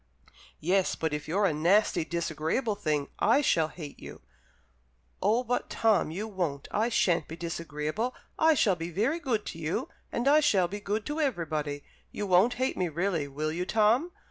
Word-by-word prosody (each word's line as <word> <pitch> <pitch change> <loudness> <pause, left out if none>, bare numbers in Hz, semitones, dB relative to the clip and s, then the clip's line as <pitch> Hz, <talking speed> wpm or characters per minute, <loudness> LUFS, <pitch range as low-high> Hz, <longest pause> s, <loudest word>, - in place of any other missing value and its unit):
"Yes, 185 +3 +1
but 160 -2 -2
if 150 0 -4
you're 200 +6 +1
a 180 - +2
nasty, 175 +3 +3
disagreeable 170 - -1
thing, 150 -8 -1
I 235 +7 +4
shall 165 - +2
hate 150 -2 -9
you." - - -10 1.0
"Oh 220 +6 +2
but, 245 0 -2
Tom, 220 -8 +2
you 195 +7 -4
won't! 175 -9 -3
I 220 +3 +1
shan't 175 -8 +2
be 165 - -7
disagreeable. 165 - -3 0.2
I 320 0 +5
shall 205 -8 +3
be 165 0 -5
very 225 - 0
good 240 -10 -1
to 165 - -6
you, 155 0 -2 0.2
and 240 +3 -1
I 295 +2 +7
shall 195 -12 +3
be 205 +4 -6
good 210 +1 -2
to 295 +2 -3
everybody. 155 - -2 0.3
You 205 - -4
won't 195 +6 +4
hate 260 +1 -1
me 180 -2 0
really, 165 -2 -1
will 150 +3 -3
you, 175 +3 -2
Tom?" 225 +10 +3
185 Hz, 180 wpm, -29 LUFS, 160-225 Hz, 1.0 s, I